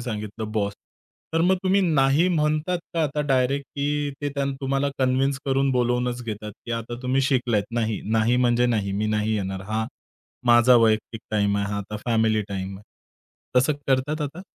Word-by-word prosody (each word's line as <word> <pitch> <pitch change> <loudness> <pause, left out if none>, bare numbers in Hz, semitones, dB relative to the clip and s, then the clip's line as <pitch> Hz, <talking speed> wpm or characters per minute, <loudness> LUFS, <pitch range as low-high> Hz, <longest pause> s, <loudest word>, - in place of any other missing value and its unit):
सांगितलं 110 -2 -5
बॉस. 100 -2 0 0.6
तर 165 - +3
मग 185 +2 +4
तुम्ही 190 +1 +3
नाही 150 -2 +3
म्हणतात 155 +1 +1 0.2
का 165 - +1
आता 150 0 -1
डायरेक्ट, 135 +1 +1
की 145 0 -1
ते 145 - -1
त्यान 140 -1 -1
तुम्हाला 135 +1 0
कन्विन्स 130 +1 +1
करून 135 0 +2
बोलावूनच 125 0 0
घेतात, 105 -1 -5
की 120 - -4
आता 115 +1 -4
तुम्ही 130 +2 +1
शिकलात 125 -6 +1
नाही, 110 -2 -1
नाही 115 +2 +3
म्हणजे 120 -1 +3
नाही, 105 -5 0
मी 105 +2 -1
नाही 105 +1 0
येणार. 95 -1 -3
हा 110 0 -1 0.6
माझा 120 +1 +6
वैयक्तिक 110 0 +2
टाईम 100 -1 +1
आहे. 100 0 0
हा 100 - -1
आता 105 +2 -5
फॅमिली 110 -2 +2
टाईम 95 -1 -4
आहे. 100 - -14 0.7
तसं 130 +5 +4
करतात 135 +4 +1
आता? 150 +4 -4
125 Hz, 175 wpm, -24 LUFS, 110-140 Hz, 0.7 s, माझा